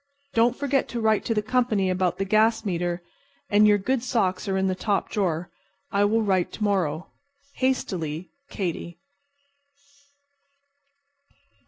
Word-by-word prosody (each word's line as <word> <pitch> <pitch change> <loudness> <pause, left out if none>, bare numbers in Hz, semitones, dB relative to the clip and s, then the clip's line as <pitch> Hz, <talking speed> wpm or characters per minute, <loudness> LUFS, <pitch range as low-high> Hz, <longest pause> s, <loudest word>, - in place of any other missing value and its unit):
Don't 235 +2 +3
forget 280 -1 0
to 240 - -4
write 220 -1 +2
to 225 - 0
the 210 - +1
company 220 -4 +1
about 185 -1 0
the 195 - -1
gas 220 +2 +3
meter, 175 -2 -2 0.5
and 210 +1 +6
your 205 0 +5
good 245 +6 0
socks 210 -8 0
are 190 -1 0
in 190 - +1
the 190 - +1
top 200 +2 -1
drawer. 175 -4 -1 0.4
I 200 +1 +3
will 220 +2 +2
write 190 -4 +1
to 215 - -4
morrow. 180 -6 0 0.5
Hastily, 180 - -1 0.2
KATY." 170 -3 -4
205 Hz, 140 wpm, -25 LUFS, 185-225 Hz, 0.5 s, and